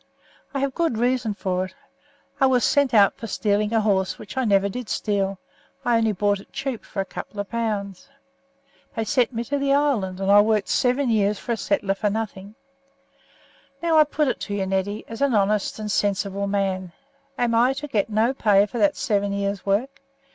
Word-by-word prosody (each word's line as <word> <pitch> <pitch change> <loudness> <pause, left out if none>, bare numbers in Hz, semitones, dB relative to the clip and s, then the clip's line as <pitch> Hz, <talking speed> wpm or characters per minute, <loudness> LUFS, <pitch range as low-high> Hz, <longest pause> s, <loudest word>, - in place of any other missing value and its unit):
I 275 - -2
have 275 -1 -1
good 330 -8 0
reasons 240 -3 0
for 185 -2 -1
it. 185 - -13 0.6
I 270 - +5
was 250 -2 +2
sent 285 -2 +3
out 205 -3 +5
for 225 - -7
stealing 210 +1 0
a 225 -1 +2
horse, 195 -3 +1
which 210 - -10
I 260 -1 0
never 200 -2 +3
did 225 +1 -6
steal; 195 -2 -1 0.5
I 240 -1 +3
only 225 -1 +2
bought 205 0 0
it - - -16
cheap 270 -4 -4
for 195 - -4
a - - -4
couple 205 +2 -8
of 205 - -4
pounds. 210 -5 -3 0.9
They 225 - -1
sent 240 +3 +1
me 230 -1 -3
to 285 +4 -2
the 275 0 +2
island, 225 -11 0
and 195 0 +1
I 205 0 +8
worked 215 -1 +1
seven 250 0 +2
years 210 -1 +2
for 240 - -5
a 230 - 0
settler 200 -1 0
for 205 +1 -1
nothing. 205 -1 -5 1.3
Now 325 -2 +4
I - - +9
put 300 0 -1
it - - -1
to 205 - -4
you, 195 -1 -1
Neddy, 195 +2 -2
as 225 +2 -8
an 280 -4 +2
honest 205 0 +1
and 215 -1 -4
sensible 200 -1 0
man, 190 -3 -1 0.4
Am 240 -1 +1
I 240 +3 +4
to 285 +2 -6
get 215 -6 0
no 220 +4 +2
pay 205 -6 +4
for 230 +3 -6
that 300 -1 +3
seven 200 -3 0
years' 200 -1 -3
work? 245 +9 -1
210 Hz, 205 wpm, -23 LUFS, 200-245 Hz, 1.3 s, I